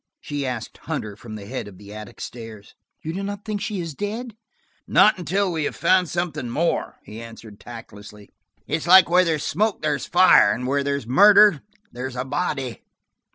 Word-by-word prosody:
she 145 -2 -4
asked 120 -3 -6
Hunter, 105 -2 -5
from 110 0 -10
the 105 -2 -9
head 100 - -5
of 100 -3 -12
the 100 +1 -12
attic 105 -1 -10
stairs, 115 -4 -9 0.3
"you 160 - -4
do 190 - -4
not 200 0 -6
think 210 -2 -3
she 205 -2 -3
is 165 -3 -5
dead?" 215 - -5 0.5
"Not 215 - +5
until 185 +3 0
we 160 -3 -2
have - - -3
found 180 0 +2
something 160 -7 -3
more," 165 +8 -1
he 110 +2 -10
answered 115 -2 -12
tactlessly. 105 -3 -12 0.3
"It's 155 +2 -3
like 185 -1 +7
where 180 +1 +5
there's 160 -4 -1
smoke 205 +2 -1
there's 145 -3 -1
fire; 175 - +5
where 140 +2 0
there's 140 -3 -2
murder 200 - +6 0.3
there's 125 +1 -6
a 125 +1 -3
body." 135 -3 -3
145 Hz, 180 wpm, -22 LUFS, 115-185 Hz, 0.5 s, like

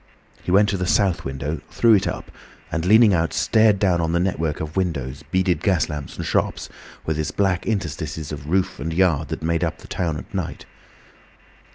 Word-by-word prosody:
He - - -7
went 100 +3 +5
to 100 - 0
the 90 -1 -2
south 95 -3 +2
window, 70 +3 -4
threw 115 -1 +4
it 100 - +3
up, - - -5 0.4
and 85 +1 -2
leaning 110 0 +6
out 80 -2 +1
stared 110 -2 +3
down 95 -3 +2
on 80 0 -1
the 85 - +2
network 85 -4 -1
of 75 -1 -5
windows, 70 -8 -2
beaded 95 -1 +1
gas 95 -5 +1
lamps 75 -4 -6
and - - -4
shops, - - -1 0.4
with 80 -1 -1
its 75 - -1
black 95 -3 0
interstices 80 -7 -3
of 75 0 -7
roof 95 +2 0
and 80 - -3
yard 80 -4 +2
that - - -5
made 85 0 0
up - - -2
the - - -14
town 80 -4 -2
at - - -10
night. - - -4
85 Hz, 200 wpm, -22 LUFS, 80-95 Hz, 0.4 s, leaning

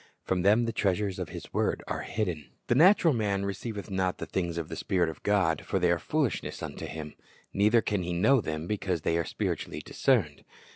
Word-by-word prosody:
From 95 -1 0
them 105 +5 +4
the 115 - -2
treasures 100 -2 0
of - - -4
His - - -9
word - - 0
are - - -3
hidden. 90 -9 -3 0.2
"The - - +2
natural 165 +3 +6
man 100 -4 0
receiveth 100 +1 -5
not 95 -1 0
the - - -5
things 85 -3 -2
of 85 -2 -3
the - - -6
Spirit 90 -3 0
of 80 - -9
God; 95 -7 +2
for 95 - -1
they 90 -2 +3
are 85 - +1
foolishness 150 - -2
unto - - -5
him; 80 -1 -7 0.4
neither 105 +3 +4
can 105 -3 0
he 90 0 -3
know 115 +10 +4
them, 80 -3 -4
because 95 -4 -2
they 80 - 0
are 85 - -1
spiritually - - -3
discerned." 100 - +1
95 Hz, 205 wpm, -29 LUFS, 85-110 Hz, 0.4 s, natural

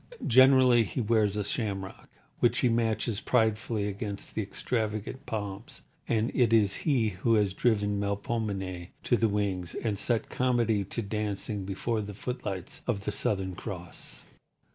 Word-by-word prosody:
Generally 130 -2 +6
he 115 - -4
wears 105 -3 +2
a 105 - 0
shamrock, 100 -3 -4 0.3
which - - +3
he 125 - +4
matches 115 -1 0
pridefully 110 -2 +1
against 100 0 -5
the - - -1
extravagant 110 +3 -3
palms; 105 +6 -5 0.2
and 115 +1 +1
it 120 -3 +3
is 105 -4 +4
he 125 -7 +3
who 105 +4 +1
has 105 -3 +2
driven 105 -2 +1
Melpomene 100 -3 -2 0.2
to - - +3
the 115 -1 +2
wings, 100 -4 -1
and 105 -4 -2
set 115 +2 +1
Comedy 120 -5 +1
to 115 - -3
dancing 105 -1 -2
before 110 +4 -1
the 105 -1 -7
footlights 100 -6 -5
of 110 -5 0
the - - 0
Southern 95 -2 0
Cross. 85 - -6
105 Hz, 145 wpm, -29 LUFS, 100-115 Hz, 0.3 s, Generally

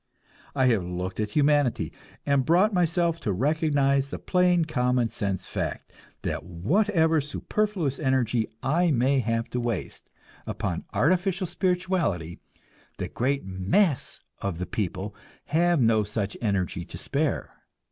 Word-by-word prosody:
I 130 -2 +3
have 115 -7 +3
looked 90 +2 -4
at 105 -1 0
humanity, 145 0 +2 0.3
and 140 -2 +3
brought 180 - +4
myself 170 -1 +1
to 105 - -1
recognize 140 - +2
the - - -4
plain 180 -2 +2
common 125 -5 +1
sense 100 -5 -3
fact - - -4 0.3
that - - -2
whatever 160 - +2
superfluous 165 0 -1
energy 125 -5 +1 0.2
I 170 +7 +2
may 135 0 +3
have 115 -1 -1
to 125 - -1
waste 120 -6 -3 0.4
upon - - -3
artificial 185 +5 +1
spirituality, 180 - -1 0.6
the - - -4
great 135 -1 -1
mass 100 - +1 0.2
of 100 -4 -3
the 90 - -3
people 100 0 -3 0.3
have 170 +1 +2
no 115 -3 +4
such 105 -1 -3
energy 95 -4 -1
to - - -9
spare. 145 +1 -1
135 Hz, 130 wpm, -26 LUFS, 105-165 Hz, 0.6 s, brought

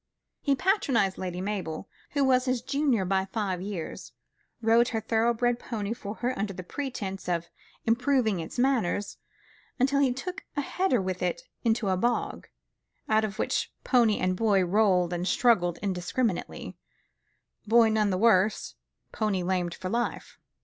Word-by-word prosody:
He 280 -2 +2
patronised 265 - +1
Lady 180 -1 -4
Mabel, 190 -4 -4 0.3
who 285 -2 +2
was 255 -1 +3
his 255 -2 0
junior 275 -7 +1
by 190 +1 +1
five 195 -3 -2
years, 190 -4 -6 0.5
rode 230 +1 +4
her 225 - -1
thorough 225 +1 +2
bred 240 +1 0
pony 215 -3 -3
for 210 -2 -7
her 250 +2 -2
under 200 0 -2
the 185 0 -7
pretence 195 -6 -5
of 170 -1 -1 0.4
improving 235 -3 +2
its 160 - -7
manners, 245 -6 +1 0.6
until 275 +2 +3
he 275 -2 +3
took 360 +10 -5
a - - +2
header 360 -3 +1
with 185 -1 -3
it - - -1 0.2
into 225 -2 +1
a 185 - +2
bog, 235 +4 -1 0.6
out 220 0 +3
of 215 -1 -3
which - - -1
pony 235 -5 +3
and 185 0 0
boy 200 -2 +3
rolled 180 -2 +3
and 175 +1 -2
struggled 195 -7 +3
indiscriminately, 190 +2 -2 0.9
boy 230 +1 +6
none 215 -1 +2
the 185 - 0
worse, 210 -1 +3 0.4
pony 205 -4 -1
lamed 180 -1 -1
for 185 - -5
life. 235 +3 -3
220 Hz, 155 wpm, -28 LUFS, 185-245 Hz, 0.9 s, boy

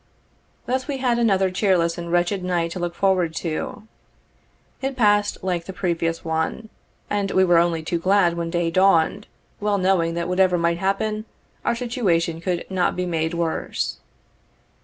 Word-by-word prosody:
Thus 260 +2 -1
we 285 -2 -2
had 245 -2 +1
another 195 -5 +2
cheerless 180 -3 +2
and 170 0 -6
wretched 175 +2 +1
night 175 -2 0
to 185 - -5
look 175 -1 -3
forward 185 -4 +1
to. 170 +7 -4 0.9
It 270 0 -2
passed 205 -5 +2
like 175 -3 -1
the 190 - -7
previous 165 -3 -2
one, 160 +7 -2 0.4
and 205 -1 -1
we 190 - +3
were 175 -2 +5
only 170 -1 +1
too 170 +1 -1
glad 185 -1 +3
when 170 -1 -3
day 170 -1 0
dawned, 190 +2 +3 0.3
well 205 0 +1
knowing 180 -3 +1
that 170 0 -2
whatever 180 0 +3
might 170 0 +1
happen, 215 +3 -1 0.4
our 235 - +1
situation 185 -10 0
could 175 -1 -2
not 185 -2 +1
be 180 - -1
made 165 -1 -1
worse. 165 - -2
180 Hz, 160 wpm, -23 LUFS, 170-200 Hz, 0.9 s, were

